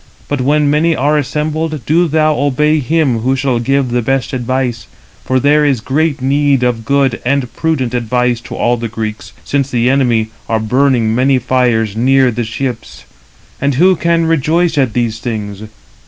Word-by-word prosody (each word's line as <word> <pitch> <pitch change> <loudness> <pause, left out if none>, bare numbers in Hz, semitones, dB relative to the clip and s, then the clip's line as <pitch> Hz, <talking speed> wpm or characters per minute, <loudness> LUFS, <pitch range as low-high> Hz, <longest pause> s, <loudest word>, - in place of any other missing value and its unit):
But 145 -2 -2
when 145 +3 +2
many 155 +3 +2
are 145 +2 +1
assembled, 150 0 -2
do 170 +3 +2
thou 155 0 +2
obey 145 +3 +1
him 145 -3 0
who 130 +4 0
shall 130 -3 0
give 135 +1 0
the 120 0 +1
best 135 +3 -1
advice; 125 -2 -2 0.4
for 130 0 0
there 150 +3 +3
is 140 -5 +1
great 140 +3 -1
need 140 -1 +2
of 120 -2 -1
good 135 -2 +1
and 130 -1 -1
prudent 140 -7 -1
[advice] 125 0 0
to - - -7
all 120 0 +1
the 115 0 -4
Greeks, 110 -1 -6
since 140 -1 -1
the 125 0 +1
enemy 120 -5 +1 0.2
are 110 -1 +1
burning 120 0 +1
many 130 +3 +2
fires 120 -4 0
near 130 +2 +3
the 120 +1 -3
ships; 115 +1 -5 0.6
and 140 0 0
who 185 +6 +4
can 170 0 +1
rejoice 165 +2 +1
at 130 -6 +1
these 115 -2 -1
things? 110 -3 -5
130 Hz, 170 wpm, -14 LUFS, 120-145 Hz, 0.6 s, who